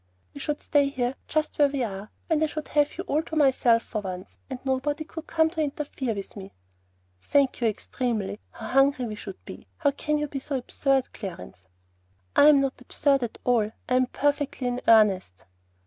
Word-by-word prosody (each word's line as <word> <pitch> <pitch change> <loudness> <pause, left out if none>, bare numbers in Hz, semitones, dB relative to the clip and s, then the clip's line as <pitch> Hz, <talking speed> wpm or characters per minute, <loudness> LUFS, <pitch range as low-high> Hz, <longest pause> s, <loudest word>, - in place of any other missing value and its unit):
"We 285 - -9
should 295 0 -2
stay 285 -1 +3
here 250 -2 -1
just 310 -1 -1
where 290 - +7
we 275 -2 -2
are, 200 -1 -5 0.2
and 320 -2 +1
I - - +3
should 305 0 -6
have 295 -1 +1
you - - -3
all 300 +2 0
to 320 - -7
myself 255 -5 +4
for 215 - -4
once, 185 -2 -7
and 260 - -4
nobody 270 +3 0
could 320 +1 -9
come 320 -1 +3
in 320 - -1
to 320 - -2
interfere 280 -5 -2
with 200 -1 -7
me." 195 -1 -9 0.7
"Thank 275 - +1
you 235 - +3
extremely! 215 -2 -2
How 225 - -10
hungry 270 -1 +3
we 220 - -4
should 200 -2 -9
be! - - -10
How 285 -3 +2
can 300 +2 -1
you 300 0 -1
be 275 -1 -4
so 275 +1 -3
absurd, 265 +1 0
Clarence?" 170 - -8 0.7
"I'm 290 -1 +7
not 270 -2 -2
absurd 275 +2 +1
at 235 -2 -4
all. 230 -4 +2 0.2
I'm 255 0 +3
perfectly 290 -1 -1
in 245 0 -1
earnest." 195 - +4
265 Hz, 195 wpm, -26 LUFS, 220-290 Hz, 0.7 s, where